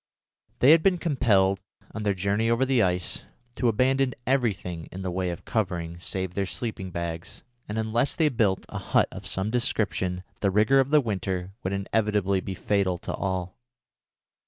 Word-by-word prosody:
They 130 - +8
had 165 0 +7
been 185 +1 +3
compelled, 100 - +2 0.3
on 110 - -5
their 100 -2 +1
journey 100 +4 0
over 115 +3 +3
the 130 -3 +3
ice, 90 -2 -1 0.3
to 125 - +1
abandon 130 +3 +2
everything 100 -10 -1
in 95 +1 -6
the 95 - -2
way 90 0 -1
of 85 - -6
covering 85 -6 -2
save 95 0 -3
their 100 0 -1
sleeping 100 -4 -4
bags, 85 -1 -5 0.3
and 105 - -3
unless 110 +4 +1
they 160 -2 +3
built 105 -7 +1
a - - -5
hut - - +2
of - - -8
some 95 +3 -1
description 100 -6 0 0.2
the 100 - +2
rigour 110 +8 +4
of 135 0 +2
the 150 0 +5
winter 95 -5 -3
would 95 - -2
inevitably 100 -1 +1
be 95 0 -5
fatal 95 -2 0
to - - -5
all. 95 -1 -3
100 Hz, 175 wpm, -26 LUFS, 95-120 Hz, 0.3 s, They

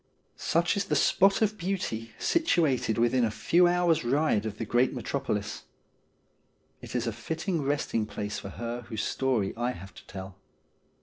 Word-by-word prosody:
Such 170 +4 +1
is 200 - 0
the - - 0
spot 195 +3 +4
of 215 0 0
beauty 170 - -3
situated 160 - +2
within 120 +2 +3
a 115 - +3
few 170 +11 +3
hours' 175 -3 +2
ride 125 -4 +2
of 105 -1 -6
the 115 - -3
great 125 +5 +2
Metropolis. 120 -4 -3 1.2
It - - -8
is 120 -1 0
a 115 - -1
fitting 160 - -2
resting 140 -6 0
place 105 0 -4
for 100 - -7
her 120 +3 -5
whose 110 -2 -2
story 125 -7 0
I 120 +2 -1
have 95 -1 -11
to - - -13
tell. 95 0 -8
125 Hz, 165 wpm, -28 LUFS, 110-170 Hz, 1.2 s, spot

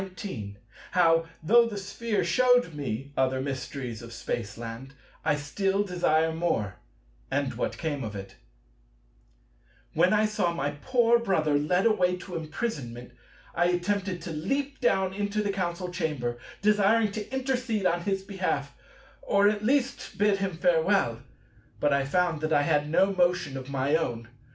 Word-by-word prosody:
§ - - -2
19 180 - -7 0.4
How, 165 -2 +4 0.2
though 235 +7 +6
the 210 -3 -5
Sphere 205 +2 -2
shewed 245 +1 +3
me 140 -2 -4
other 130 0 +1
mysteries 130 -3 -4
of 115 0 -10
Spaceland, 115 +3 -5 0.3
I - - +2
still 195 +7 0
desire 160 -4 +1
more; 115 - -1 0.5
and 135 -1 -1
what 120 - -3
came 145 -4 -3
of 105 -2 -5
it 100 -1 -8 1.6
When 185 - +4
I 215 0 +4
saw 210 -6 0
my 145 -2 -1
poor 235 - +3
brother 160 -9 +1
led 165 +7 +2
away 185 -5 +3
to 180 0 -8
imprisonment, 145 - -4 0.4
I 175 - +2
attempted 180 0 -1
to 170 - -5
leap 270 - -2
down 190 -1 +2
into 205 +1 -1
the 205 - 0
Council 180 -2 -3
Chamber, 150 -9 -2 0.2
desiring 210 +1 +4
to 210 +2 -6
intercede 255 -6 -1
on 175 -1 +2
his 195 +1 -1
behalf, 185 -8 -2 0.5
or 200 0 +4
at 210 0 -2
least 270 +3 0
bid 205 -1 +3
him 190 -4 -2
farewell. 170 - +2 0.6
But 145 -1 +2
I 140 -1 +2
found 170 +1 +1
that 155 0 -1
I 145 - +4
had 150 -1 +1
no 195 +5 +3
motion 175 -6 +1
of 130 0 -6
my 140 +2 +1
own. 120 -8 -2
175 Hz, 155 wpm, -27 LUFS, 140-205 Hz, 1.6 s, though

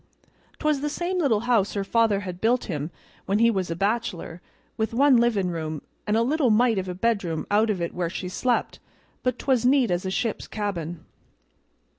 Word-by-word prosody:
'Twas 305 -3 0
the 295 - -1
same 355 +4 -2
little 240 -10 +2
house 230 -5 +1
her 200 - 0
father 220 -1 +2
had 180 -2 -7
built 240 +3 +2
him 150 -5 -4 0.4
when 195 - +2
he 230 +1 +5
was 190 -5 -2
a 165 - -2
bachelor, 195 -4 -2 0.3
with 220 +1 -2
one 280 +1 +5
livin' 225 -6 +2
room, 155 -2 -4 0.3
and 210 +1 +2
a 230 - +3
little 280 +1 +2
mite 225 -1 +3
of 185 0 -4
a 180 - -4
bedroom 195 -6 -1
out 215 +2 +3
of 200 -4 0
it 170 -1 -3
where 175 -2 -2
she 185 +1 -5
slept, 240 +7 -1 0.4
but 255 -1 0
'twas 255 -4 +1
neat 255 -3 +3
as 175 0 0
a 190 - -2
ship's 215 +3 -2
cabin. 175 -6 -4
215 Hz, 195 wpm, -25 LUFS, 180-240 Hz, 0.4 s, he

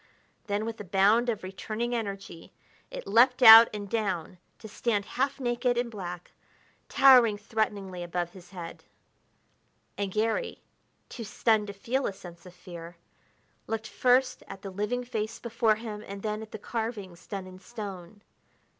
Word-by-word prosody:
Then, 205 +1 -1
with 225 0 -5
a - - -6
bound 205 +6 +3
of 215 -4 -2
returning 215 +5 -4
energy, 200 -7 -6 0.4
it - - -8
leaped 250 +3 +4
out 225 0 +11
and 205 -1 -6
down 190 -5 -3 0.2
to 220 - -11
stand 210 -1 -1
half 275 +2 -2
naked 245 -1 0
and 240 -1 -1
black, 180 -4 -7 0.6
towering 245 -6 +6
threateningly 205 -4 -3
above 175 0 -3
his 180 -1 -15
head. 175 -3 -9 1.2
And 200 -1 -2
Garry, 225 - -1 0.4
too 235 - -8
stunned 215 0 +1
to 200 - -6
feel 245 +7 -2
a - - -3
sense 175 -2 -13
of 180 - -14
fear, 170 -1 -10 0.7
looked 225 0 -3
first 255 0 +2
at 195 - -10
the 195 - -6
living 210 +6 -2
face 225 -2 -4
before 230 -2 +1
him 215 -1 -7
and 200 0 -8
then 215 0 -2
at 220 - -9
the - - -6
carvings 210 -6 -5
done 195 -2 -5
in 185 0 -12
stone. 200 -1 -9
210 Hz, 155 wpm, -28 LUFS, 190-235 Hz, 1.2 s, out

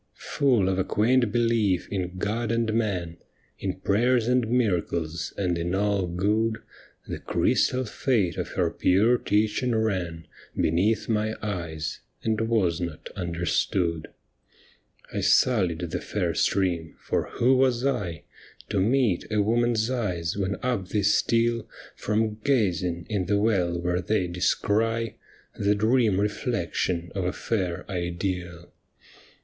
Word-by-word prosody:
Full 125 -9 +1
of 95 0 0
a - - +3
quaint 120 +3 +2
belief 115 -5 +1
in 90 -2 -3
God 110 +4 -1
and 115 -1 0
man. 95 -7 -1 0.4
In 95 -1 -4
prayers 120 +4 +2
and 125 -2 +2
miracles, 85 -8 0
and 90 -4 0
in 85 +2 -1
all 100 -2 +1
good. 105 +6 0 0.5
The - - -5
crystal 130 0 +1
fate 105 - 0
of - - -4
her - - +1
pure 110 +7 +3
teaching 110 +4 +1
ran 90 -7 -1 0.3
Beneath 95 +8 +1
my 110 0 0
eyes, 85 -6 -4 0.2
and 110 -1 0
was 105 -7 +1
not 85 -3 -5
understood. 85 -1 -1 1.1
I - - -1
sullied 95 -10 +3
the - - -2
fair - - -1
stream, 85 -5 0
for - - -2
who 130 +3 +3
was 130 -1 +2
I 95 - -1 0.5
To 100 - 0
meet 110 -2 +1
a 105 - +1
woman's 115 +2 +2
eyes 90 -10 -2
when 100 0 -1
up 120 -7 -1
they 105 +1 -1
steal 115 +3 +2 0.3
From 110 0 -1
gazing 90 -10 +1
in 100 -5 -1
the 105 - +2
well 95 -5 +1
where 90 +1 0
they 95 +1 0
descry 110 +5 0 0.4
The 100 +1 +2
dream 110 -2 +2
reflection 95 -5 -1
of 95 - -2
a 90 - 0
fair 90 -6 -2
ideal 90 -1 -4
100 Hz, 130 wpm, -26 LUFS, 90-115 Hz, 1.1 s, a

